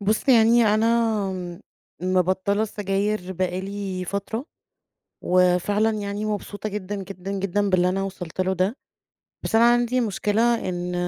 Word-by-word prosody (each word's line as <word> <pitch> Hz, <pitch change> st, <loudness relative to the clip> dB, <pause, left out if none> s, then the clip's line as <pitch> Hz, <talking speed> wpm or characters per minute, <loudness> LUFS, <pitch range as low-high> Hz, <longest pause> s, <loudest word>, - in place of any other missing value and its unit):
بُص 210 Hz, +6 st, 0 dB
يعني 235 Hz, -1 st, +6 dB
أنا 215 Hz, -6 st, 0 dB, 0.4 s
مِبطّلة 185 Hz, +3 st, +1 dB
السجاير 200 Hz, -2 st, -2 dB
بقي 185 Hz, 0 st, -2 dB
لي 195 Hz, -1 st, -4 dB
فترة، 200 Hz, -, -4 dB, 0.8 s
وفعلًا 185 Hz, +4 st, +3 dB
يعني 205 Hz, -1 st, -3 dB
مبسوطة 210 Hz, 0 st, -4 dB
جدًا، 205 Hz, -1 st, -5 dB
جدًا، 195 Hz, -1 st, -6 dB
جدًا 200 Hz, +1 st, 0 dB
باللي 180 Hz, -1 st, +3 dB
أنا 195 Hz, +1 st, -1 dB
وصلت 185 Hz, -3 st, -5 dB
له 185 Hz, 0 st, +1 dB
ده. 190 Hz, +6 st, 0 dB, 0.7 s
بس -, -, -4 dB
أنا 235 Hz, +1 st, +6 dB
عندي 240 Hz, +1 st, +1 dB
مشكلة، 225 Hz, +1 st, +1 dB
إن 180 Hz, 0 st, -3 dB
200 Hz, 130 wpm, -24 LUFS, 185-215 Hz, 0.8 s, يعني